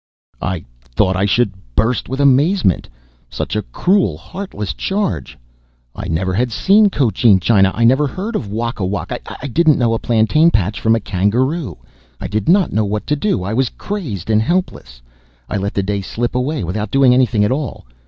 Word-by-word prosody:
I 95 -3 -3 0.2
thought 95 +10 0
I 95 +2 +1
should 105 0 +1 0.2
burst 115 +3 0
with 135 +2 -4
amazement! 140 - +2 0.4
Such - - -4
a - - 0
cruel, 100 - 0
heartless 105 - -6
charge! 200 -1 -3 0.6
I - - -6
never 90 +3 -1
had 120 +5 0
seen 205 - +4
Cochin 115 - +3
China! 95 0 +3
I 115 - 0
never 135 +5 +4
had - - -10
heard 210 +5 -4
of 105 - -3
Wakawak! 105 -5 -3 0.2
I - - -8
didn't 155 +3 +3
know 120 -3 +1
a 115 - -1
plantain 120 +8 +3
patch 105 - -1
from 110 0 +3
a - - 0
kangaroo! 120 - -1 0.4
I - - -6
did 105 +4 -2
not 190 +1 +3
know 110 - +2
what 105 +1 -3
to 150 - 0
do. 150 - -1
I 100 +4 -3
was 130 +1 +1
crazed 120 - -5
and 110 0 +3
helpless. 110 - -3 0.4
I - - -2
let 100 +1 -3
the 100 - 0
day 100 +1 -2
slip 120 +5 -3
away 130 0 -1
without 100 +5 -3
doing 135 0 +4
anything 125 -4 +2
at 105 - 0
all. 135 - -3
115 Hz, 185 wpm, -17 LUFS, 100-145 Hz, 0.6 s, seen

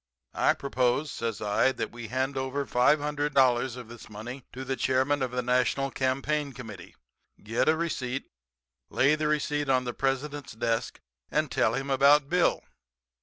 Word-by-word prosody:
I - - +3
propose,' 130 +1 0
says 115 -4 -4
I, 105 +5 +2
'that - - -4
we 120 -1 -8
hand 130 +4 -1
over 135 +1 -2
$500 135 -2 +2
of 125 -2 -8
this 120 -1 -12
money 120 +5 -8
to 130 +1 -7
the 135 +1 -1
chairman 130 +2 +1
of 130 - 0
the 125 0 -2
national 125 +2 +1
campaign 135 +2 -1
committee, 110 -8 -10 0.5
get 115 +7 +1
a 160 - +3
receipt, 135 -6 -2 0.6
lay 135 +3 +3
the 155 0 0
receipt 145 -1 0
on 130 -1 +3
the 120 -1 -4
President's 135 +1 -2
desk 115 +1 -2 0.3
and 155 -3 0
tell 110 - +2
him 135 +1 -3
about 140 +1 +5
Bill. 180 +1 +2
130 Hz, 160 wpm, -28 LUFS, 125-145 Hz, 0.6 s, about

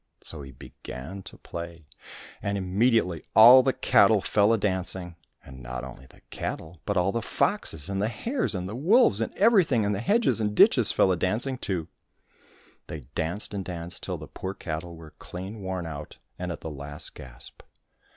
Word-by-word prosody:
So 80 - -4
he 70 - -9
began 65 +7 -9
to - - -11
play, 85 -2 -8 0.6
and 100 0 -1
immediately 95 -2 +1
all 120 +4 +10
the - - +2
cattle - - +4
fell 105 +1 +2
a 115 - +3
dancing; 95 -3 -2 0.3
and 65 -1 -12
not 60 +1 -6
only 65 0 -10
the - - -21
cattle, 80 +1 -5
but 100 -2 0
all 90 +2 +2
the 115 - -2
foxes, 80 -6 -1
and 95 0 -2
the 105 - +1
hares, 230 - -2
and 90 0 -3
the 105 - -6
wolves, 160 - +4
and 115 - -1
everything 190 - +4
in 100 - 0
the 100 - -1
hedges 215 - +2
and 105 -1 -1
ditches - - +6
fell 95 - +3
a - - +2
dancing 115 +9 -1
too. 90 -8 -3 1.0
They 75 - -7
danced 85 +7 -2
and 100 -2 -3
danced 85 -1 -5
till - - -4
the - - -9
poor 95 +1 -6
cattle 85 -1 -5
were 80 -2 -13
clean 95 +4 -8
worn 95 -2 -4
out 75 -2 -8 0.2
and 90 0 -3
at 80 - -7
the 80 - -6
last 75 +1 -7
gasp. 65 -1 -10
95 Hz, 185 wpm, -26 LUFS, 80-110 Hz, 1.0 s, all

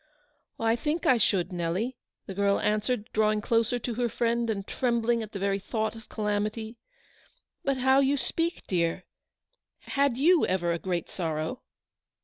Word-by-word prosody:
" 295 - -45
I 225 0 +3
think 300 +7 -2
I 255 - +5
should, 185 -5 +1
Nelly," 180 +9 -1 0.3
the 195 - -6
girl 200 +1 +2
answered, 215 +2 0
drawing 215 0 +3
closer 230 +2 +1
to 240 0 -3
her 240 +1 0
friend, 235 +1 0
and 200 -3 -2
trembling 235 -1 +1
at 215 -1 -6
the - - -5
very 195 0 0
thought 220 +2 -2
of 225 -1 -12
calamity; 215 +2 -2 0.4
" - - -37
but 275 -1 +1
how 265 +1 +4
you 275 +1 +3
speak, 330 +7 -1
dear. 170 -1 0 0.8
Had 280 -3 +1
you 335 +5 +5
ever 175 -2 +1
a 170 - -1
great 175 -2 -2
sorrow?" 160 +3 -3
220 Hz, 165 wpm, -28 LUFS, 195-245 Hz, 0.8 s, I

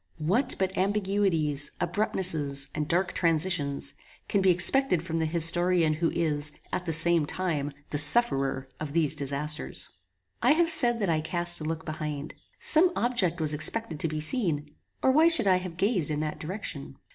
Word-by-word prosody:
What 220 - 0
but 190 0 -3
ambiguities, 190 -7 0
abruptnesses, 155 -9 0
and 150 -1 -4
dark 175 +3 -1
transitions, 165 -4 -1 0.3
can 200 - -1
be 190 - +2
expected 185 - +1
from 165 -1 -4
the 160 - -1
historian 170 0 +1
who 165 +2 -1
is, 150 -3 -3 0.2
at 180 - -4
the - - -1
same 165 -1 +4
time, 155 -6 -3 0.2
the 145 - 0
sufferer 140 - +6
of 150 -2 -7
these 155 -3 0
disasters? 145 - -5 0.5
I 250 +5 +3
have 335 +1 +2
said 240 -6 +5
that 195 - -1
I 160 -2 0
cast 175 +1 0
a - - -6
look 160 0 -5
behind. 155 -1 -6 0.2
Some 345 +3 +5
object 195 -9 -1
was 155 -1 +1
expected 155 +3 -2
to 165 - -1
be 155 -1 -5
seen, 155 - -2 0.3
or 260 - +3
why 310 +5 +4
should 325 -10 +5
I 185 -2 +3
have 180 -2 -8
gazed 195 - 0
in 150 -1 -3
that 155 -1 -5
direction? 155 -6 -8
165 Hz, 170 wpm, -26 LUFS, 150-190 Hz, 0.5 s, sufferer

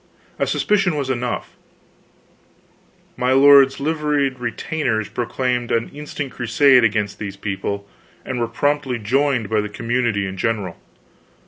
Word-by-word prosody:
A - - +1
suspicion 195 -5 +1
was 140 -3 -2
enough; 125 -1 -3 1.6
my 125 +1 +1
lord's 140 0 +6
liveried 145 -3 0
retainers 120 -1 -2
proclaimed 125 0 -2
an 115 0 0
instant 145 -2 -6
crusade 125 +2 +4
against 105 -2 0
these 100 -2 -6
people, 100 0 -4 0.4
and 130 -2 -3
were 115 - 0
promptly 140 +1 -1
joined 125 +1 0
by 110 0 +1
the 105 - -5
community 115 -1 -1
in 95 0 -6
general. 100 -4 -2
125 Hz, 125 wpm, -20 LUFS, 110-140 Hz, 1.6 s, lord's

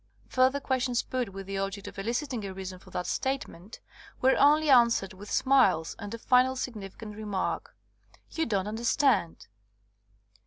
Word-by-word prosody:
'' - - -32
Further 260 +2 +4
questions 255 -3 0
put 255 -4 -3
with 195 0 -8
the 195 0 -4
object 195 +1 -4
of - - -8
eliciting 240 +3 -2
a 195 -1 -6
reason 190 -1 -7
for - - -17
that 180 - -4
statement 245 -7 -4 0.4
were 265 +1 +4
only 300 +2 +4
answered 235 -7 +4
with 200 +2 -11
smiles 220 -12 +3
and 205 -2 -7
a 230 - -4
final 255 +2 +3
sig 255 -1 -4
nificant 210 +1 -9
remark, 205 -3 -3 0.6
*'You 325 - -1
don't 200 -4 0
understand." 225 - +1
225 Hz, 160 wpm, -28 LUFS, 195-260 Hz, 0.6 s, Further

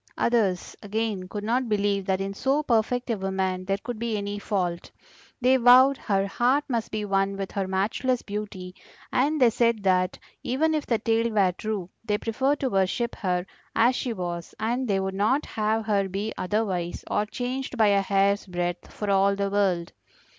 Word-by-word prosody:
Others, 210 -7 +1
again, 210 -2 -2
could 205 +2 -5
not 240 +3 0
believe 200 -2 0
that 190 -1 +1
in 195 0 -3
so 270 +8 0
perfect 245 0 +1
a 225 - 0
woman 190 -1 -1
there 195 +1 0
could 225 +2 -6
be 230 -2 -1
any 205 0 -4
fault; 180 -5 -2 0.5
they 255 +1 +4
vowed 255 +3 +7
her 195 -4 0
heart 250 +8 +2
must 235 -5 -2
be 215 -1 -3
one 195 0 0
with 195 -1 -4
her 195 -2 -2
matchless 220 +7 0
beauty, 200 -3 -6 0.4
and 295 +4 +2
they 245 -3 +5
said 230 -2 +1
that 185 -1 +2 0.2
even 315 +6 +1
if 305 -2 -1
the 230 - +2
tale 230 +1 +1
were 200 -4 +3
true, 200 -1 -4 0.2
they 210 -2 0
preferred 265 +7 0
to 265 - +1
worship 195 +5 0
her 180 -3 -1 0.3
as 245 +3 +4
she 250 - -2
was, 175 -5 -5
and 240 +4 -1
they 195 -2 +1
would 190 0 -2
not 215 +9 +1
have 220 +1 -1
her 200 -3 +1
be 205 +4 -3
otherwise 185 -3 -2
or 210 - -1
changed 255 +3 -4
by 215 -2 +5
a 200 -1 +4
hair's 200 +1 +1
breadth 175 -1 -3
for 210 -1 -3
all 195 0 +3
the 200 0 -1
world. 190 -4 +1
210 Hz, 185 wpm, -26 LUFS, 195-235 Hz, 0.5 s, vowed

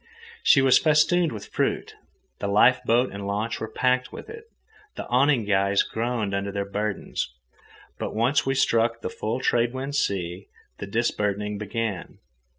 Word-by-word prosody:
She 135 - +5
was 130 -1 +6
festooned 160 +2 +3
with 105 -3 -9
fruit. - - -1 0.5
The 100 - -2
life 115 +6 +4
boat 120 +3 +2
and 100 0 -6
launch 105 +3 -2
were 110 - -4
packed 125 +2 +1
with - - -9
it. 450 0 -10 0.5
The - - -5
awning 125 -2 +3
guys 100 0 +2
groaned 115 -3 -2
under 100 +1 -2
their 100 0 -2
burdens. 100 -7 -3 0.7
But - - -4
once 120 +6 +2
we 135 0 -1
struck 115 -3 +2
the - - -4
full 115 +4 -3
trade 120 -1 +1
wind 135 +2 -4
sea, 95 -7 -2 0.3
the 100 - -5
disburdening 105 -2 -1
began. 105 -2 -4
115 Hz, 155 wpm, -25 LUFS, 100-130 Hz, 0.7 s, was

